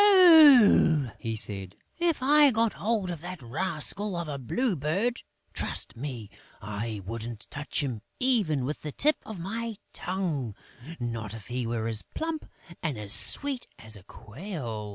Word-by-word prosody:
"Ah," 290 Hz, -, +7 dB
he 115 Hz, -2 st, -3 dB
said, 100 Hz, -3 st, -1 dB, 0.2 s
"if 335 Hz, -6 st, +1 dB
I 295 Hz, +1 st, +7 dB
got 225 Hz, -2 st, +1 dB
hold 210 Hz, -4 st, -1 dB
of 165 Hz, -3 st, -6 dB
that 180 Hz, 0 st, -7 dB
rascal 170 Hz, -, -3 dB
of 170 Hz, -1 st, -3 dB
a 140 Hz, -2 st, -4 dB
Blue 215 Hz, -, 0 dB
Bird, 185 Hz, -, -1 dB, 0.3 s
trust -, -, -5 dB
me, 120 Hz, -4 st, -6 dB, 0.3 s
I 105 Hz, 0 st, -5 dB
wouldn't 115 Hz, +1 st, -6 dB
touch 145 Hz, +1 st, -3 dB
him 120 Hz, -6 st, -3 dB, 0.2 s
even 205 Hz, -, +3 dB
with 150 Hz, +3 st, -4 dB
the 150 Hz, -, -5 dB
tip 300 Hz, -, +2 dB
of 220 Hz, -, -6 dB
my 220 Hz, +5 st, -4 dB, 0.2 s
tongue, 165 Hz, -, -3 dB, 0.4 s
not 115 Hz, -3 st, -4 dB
if 110 Hz, -1 st, -11 dB
he 125 Hz, -1 st, -2 dB
were 115 Hz, -1 st, -2 dB
as 110 Hz, -2 st, 0 dB
plump 320 Hz, -1 st, -4 dB, 0.4 s
and 110 Hz, -, -3 dB
sweet 275 Hz, -, +1 dB
as 110 Hz, -1 st, -7 dB
a 105 Hz, -, -12 dB
quail!" 115 Hz, -, -7 dB
150 Hz, 155 wpm, -28 LUFS, -, 0.4 s, Ah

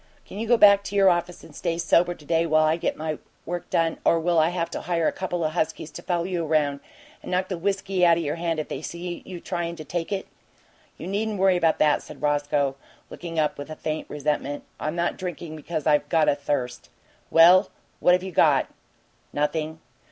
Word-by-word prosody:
"Can 200 Hz, -, -9 dB
you 225 Hz, -, -3 dB
go 240 Hz, +1 st, +5 dB
back 200 Hz, -2 st, +7 dB
to 205 Hz, -, -5 dB
your 195 Hz, -2 st, +6 dB
office 175 Hz, 0 st, -2 dB
and -, -, -14 dB
stay 165 Hz, -, -2 dB
sober 175 Hz, +1 st, +2 dB
to 150 Hz, -, -17 dB
day, 165 Hz, +2 st, +1 dB
while 155 Hz, 0 st, +4 dB
I 155 Hz, +1 st, +3 dB
get 170 Hz, -, -2 dB
my 155 Hz, -1 st, -3 dB, 0.3 s
work 175 Hz, 0 st, -5 dB
done, 165 Hz, -1 st, +1 dB
or 165 Hz, -, +4 dB
will 170 Hz, 0 st, +2 dB
I 160 Hz, +1 st, +4 dB
have 175 Hz, -1 st, -2 dB
to -, -, -4 dB
hire 170 Hz, -2 st, 0 dB
a -, -, +2 dB
couple 180 Hz, -2 st, -3 dB
o' -, -, +2 dB
huskies 155 Hz, -1 st, -2 dB
to -, -, -8 dB
follow 175 Hz, -2 st, -1 dB
you 175 Hz, -2 st, -2 dB
around 150 Hz, -3 st, +1 dB, 0.4 s
and -, -, -9 dB
knock 185 Hz, +1 st, 0 dB
the 185 Hz, -, -2 dB
whiskey 195 Hz, 0 st, -1 dB
out 170 Hz, -1 st, +6 dB
o' -, -, 0 dB
your 155 Hz, -1 st, -2 dB
hand 165 Hz, -1 st, -1 dB
if 155 Hz, -, -3 dB
they -, -, -5 dB
see 175 Hz, +2 st, -6 dB
you 180 Hz, -2 st, -7 dB
tryin' 170 Hz, -1 st, -3 dB
to 155 Hz, -2 st, -9 dB
take 170 Hz, +4 st, -4 dB
it?" 195 Hz, -1 st, -2 dB, 0.7 s
"You -, -, -8 dB
needn't 210 Hz, +2 st, -2 dB
worry 190 Hz, -1 st, +4 dB
about 165 Hz, -2 st, +2 dB
that," 150 Hz, -1 st, +3 dB
said 150 Hz, -, -12 dB
Roscoe, 145 Hz, -2 st, 0 dB, 0.3 s
looking 165 Hz, -2 st, -7 dB
up 150 Hz, -2 st, 0 dB
with 145 Hz, -, -7 dB
a 155 Hz, -, -6 dB
faint 155 Hz, 0 st, -4 dB
resentment. 145 Hz, -1 st, -2 dB, 0.2 s
"I'm 155 Hz, +2 st, -3 dB
not 175 Hz, 0 st, -1 dB
drinking 175 Hz, -3 st, -6 dB
because 155 Hz, 0 st, -5 dB
I've 150 Hz, -2 st, +2 dB
got 160 Hz, -2 st, +3 dB
a -, -, +5 dB
thirst." 140 Hz, -3 st, -3 dB, 0.4 s
"Well, 180 Hz, +4 st, +7 dB, 0.3 s
what 180 Hz, -, +5 dB
have 180 Hz, 0 st, +2 dB
you 190 Hz, -, -5 dB
got?" -, -, +3 dB, 0.6 s
"Nothing. 155 Hz, +2 st, -2 dB
165 Hz, 225 wpm, -25 LUFS, 155-180 Hz, 0.7 s, back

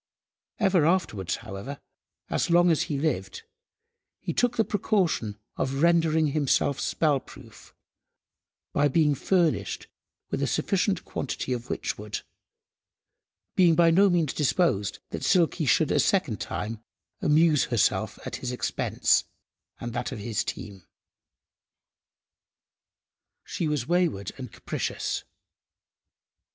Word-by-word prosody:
Ever 190 Hz, -6 st, +3 dB
afterwards, 135 Hz, -, 0 dB
however, 115 Hz, +7 st, -7 dB, 0.5 s
as -, -, -1 dB
long 175 Hz, 0 st, +5 dB
as 160 Hz, -, +2 dB
he 145 Hz, -, -1 dB
lived, 95 Hz, -, -2 dB, 0.8 s
he -, -, -4 dB
took 245 Hz, -1 st, +1 dB
the 225 Hz, -, +3 dB
precaution 180 Hz, -, 0 dB, 0.2 s
of 135 Hz, +3 st, -1 dB
rendering 160 Hz, -2 st, +3 dB
himself 140 Hz, -1 st, +1 dB
spell–proof, 135 Hz, -6 st, -2 dB, 1.0 s
by 145 Hz, +1 st, +3 dB
being 150 Hz, +1 st, +3 dB
furnished 170 Hz, +3 st, 0 dB, 0.5 s
with -, -, -1 dB
a -, -, +1 dB
sufficient -, -, 0 dB
quantity 130 Hz, -, -3 dB
of 120 Hz, -1 st, -5 dB
witchwood, 105 Hz, 0 st, -4 dB, 1.3 s
being 175 Hz, -3 st, +5 dB
by 165 Hz, 0 st, +5 dB
no 195 Hz, +4 st, +5 dB
means 170 Hz, -6 st, +1 dB
disposed 130 Hz, -, +1 dB
that -, -, -5 dB
Silky 170 Hz, -4 st, +2 dB
should 105 Hz, -, +3 dB
a -, -, +3 dB
second -, -, +1 dB
time 110 Hz, +1 st, -4 dB, 0.4 s
amuse 150 Hz, -1 st, +4 dB
herself 120 Hz, -4 st, +1 dB
at -, -, -4 dB
his 125 Hz, -, -4 dB
expense 125 Hz, -, +1 dB, 0.5 s
and 120 Hz, -1 st, -5 dB
that 120 Hz, +1 st, -3 dB
of -, -, -5 dB
his 110 Hz, +1 st, -2 dB
team. 100 Hz, -2 st, -7 dB, 2.6 s
She 165 Hz, -, -3 dB
was 150 Hz, -5 st, -1 dB
wayward 170 Hz, -, +1 dB
and 125 Hz, -4 st, -7 dB
capricious. -, -, -3 dB
150 Hz, 115 wpm, -26 LUFS, 120-170 Hz, 2.6 s, long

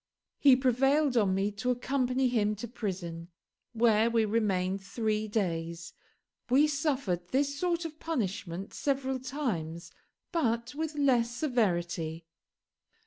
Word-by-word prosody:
He 275 Hz, -3 st, +7 dB
prevailed 270 Hz, +2 st, +2 dB
on 200 Hz, -5 st, +3 dB
me 195 Hz, +2 st, 0 dB
to 215 Hz, +5 st, -3 dB
accompany 255 Hz, +1 st, +1 dB
him 215 Hz, -4 st, +1 dB
to 220 Hz, +4 st, -6 dB
prison, 180 Hz, -7 st, -5 dB, 0.5 s
where 225 Hz, -1 st, +4 dB
we 230 Hz, -1 st, +2 dB
remained 195 Hz, -3 st, 0 dB
three 215 Hz, +3 st, -1 dB
days. 170 Hz, -5 st, -2 dB, 0.6 s
We 270 Hz, +4 st, +5 dB
suffered 275 Hz, -, -1 dB
this 280 Hz, +4 st, 0 dB
sort 345 Hz, -1 st, 0 dB
of 315 Hz, -1 st, -7 dB
punishment 200 Hz, -, -3 dB
several 265 Hz, -2 st, -1 dB
times, 215 Hz, -, -4 dB, 0.4 s
but 235 Hz, -8 st, 0 dB
with 310 Hz, +1 st, -3 dB
less 255 Hz, -5 st, +3 dB
severity. 175 Hz, -, -1 dB
230 Hz, 120 wpm, -30 LUFS, 190-270 Hz, 0.6 s, He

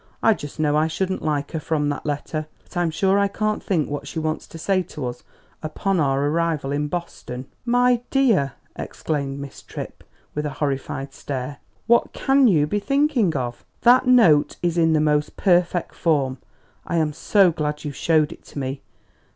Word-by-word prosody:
"I 225 Hz, -, +6 dB
just 145 Hz, -6 st, -9 dB
know 150 Hz, -1 st, +2 dB
I 155 Hz, +1 st, +3 dB
shouldn't 185 Hz, +4 st, -2 dB
like 145 Hz, -2 st, -1 dB
her 160 Hz, -, -2 dB
from 150 Hz, -1 st, 0 dB
that 145 Hz, +1 st, -4 dB
letter. 150 Hz, +1 st, -3 dB, 0.2 s
But -, -, -20 dB
I'm 175 Hz, -1 st, +1 dB
sure 195 Hz, +5 st, +2 dB
I 200 Hz, -, +3 dB
can't 215 Hz, +1 st, -1 dB
think 165 Hz, -7 st, 0 dB
what 145 Hz, 0 st, -5 dB
she 140 Hz, -, -7 dB
wants 155 Hz, 0 st, -2 dB
to -, -, -10 dB
say 185 Hz, +3 st, +1 dB
to 150 Hz, -5 st, -6 dB
us 125 Hz, 0 st, -5 dB, 0.4 s
'upon 180 Hz, +4 st, -1 dB
our 140 Hz, -1 st, +2 dB
arrival 155 Hz, -2 st, 0 dB
in 145 Hz, +1 st, 0 dB
Boston.'" 145 Hz, -6 st, -5 dB, 0.2 s
"My 245 Hz, 0 st, +3 dB
dear!" 220 Hz, -, +3 dB, 0.2 s
exclaimed 140 Hz, -3 st, -3 dB
Miss 140 Hz, -1 st, -8 dB
Tripp, -, -, -8 dB, 0.3 s
with 150 Hz, 0 st, -2 dB
a 145 Hz, -, -7 dB
horrified 135 Hz, -1 st, -3 dB
stare, 140 Hz, 0 st, -5 dB, 0.3 s
"what 235 Hz, +1 st, +3 dB
can 270 Hz, -1 st, +4 dB
you 155 Hz, -8 st, +4 dB
be 205 Hz, +8 st, -1 dB
thinking 275 Hz, -, +2 dB
of? 120 Hz, -2 st, -4 dB, 0.2 s
That 250 Hz, +1 st, +5 dB
note 220 Hz, -13 st, +5 dB
is 170 Hz, -1 st, +1 dB
in 165 Hz, -2 st, +3 dB
the 155 Hz, -, +3 dB
most 150 Hz, -1 st, +1 dB
perfect 175 Hz, -2 st, +2 dB
form. 135 Hz, -6 st, 0 dB, 0.5 s
I 170 Hz, -, -1 dB
am 155 Hz, -2 st, +1 dB
so 190 Hz, +3 st, +4 dB
glad 150 Hz, -2 st, -3 dB
you 150 Hz, -, -3 dB
showed 155 Hz, +2 st, +2 dB
it -, -, -12 dB
to -, -, -12 dB
me! 135 Hz, 0 st, -3 dB
155 Hz, 185 wpm, -23 LUFS, 145-190 Hz, 0.5 s, I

